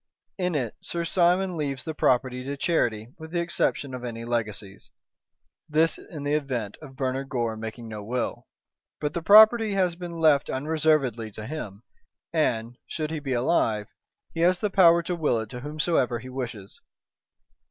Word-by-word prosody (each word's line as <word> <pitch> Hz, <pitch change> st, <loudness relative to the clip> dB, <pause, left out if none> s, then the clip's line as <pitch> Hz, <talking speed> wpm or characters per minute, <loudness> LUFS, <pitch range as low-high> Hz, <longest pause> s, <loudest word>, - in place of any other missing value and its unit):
"In 180 Hz, -2 st, 0 dB
it 125 Hz, -6 st, -1 dB
Sir 170 Hz, 0 st, -3 dB
Simon 180 Hz, +2 st, +2 dB
leaves 140 Hz, -4 st, -3 dB
the 160 Hz, -, -4 dB
property 125 Hz, -3 st, +1 dB
to 140 Hz, +1 st, -4 dB
charity 115 Hz, -9 st, 0 dB
with 160 Hz, 0 st, -9 dB
the 175 Hz, +1 st, -1 dB
exception 170 Hz, -5 st, -1 dB
of 125 Hz, -1 st, -6 dB
any 115 Hz, -1 st, -5 dB
legacies. 110 Hz, -4 st, -3 dB, 0.8 s
This 160 Hz, +2 st, +2 dB
in 150 Hz, -4 st, -9 dB
the 145 Hz, +1 st, 0 dB
event 130 Hz, -9 st, -2 dB
of 135 Hz, -4 st, -11 dB
Bernard 135 Hz, 0 st, -2 dB
Gore 120 Hz, -3 st, -1 dB
making 110 Hz, +1 st, -7 dB
no 105 Hz, -2 st, -7 dB
will. 120 Hz, +3 st, -3 dB, 0.5 s
But 150 Hz, 0 st, -2 dB
the 170 Hz, -, -2 dB
property 215 Hz, +4 st, +7 dB
has 180 Hz, -3 st, +1 dB
been 170 Hz, -1 st, -7 dB
left 155 Hz, -3 st, +4 dB
unreservedly 140 Hz, -5 st, +1 dB
to 110 Hz, -, -7 dB
him, 110 Hz, -7 st, -6 dB, 0.5 s
and, 120 Hz, -6 st, 0 dB
should 155 Hz, -1 st, -3 dB
he 160 Hz, -, -2 dB
be 135 Hz, -3 st, -3 dB
alive, 115 Hz, -5 st, +1 dB, 0.4 s
he 165 Hz, -, -5 dB
has 175 Hz, +1 st, +4 dB
the 210 Hz, -, -1 dB
power 170 Hz, -3 st, +6 dB
to 175 Hz, +1 st, -2 dB
will 150 Hz, -8 st, +1 dB
it 110 Hz, -1 st, -5 dB
to 125 Hz, -, -6 dB
whomsoever 150 Hz, -3 st, 0 dB
he 125 Hz, +2 st, -9 dB
wishes." 115 Hz, -6 st, -6 dB
140 Hz, 170 wpm, -26 LUFS, 120-165 Hz, 0.8 s, property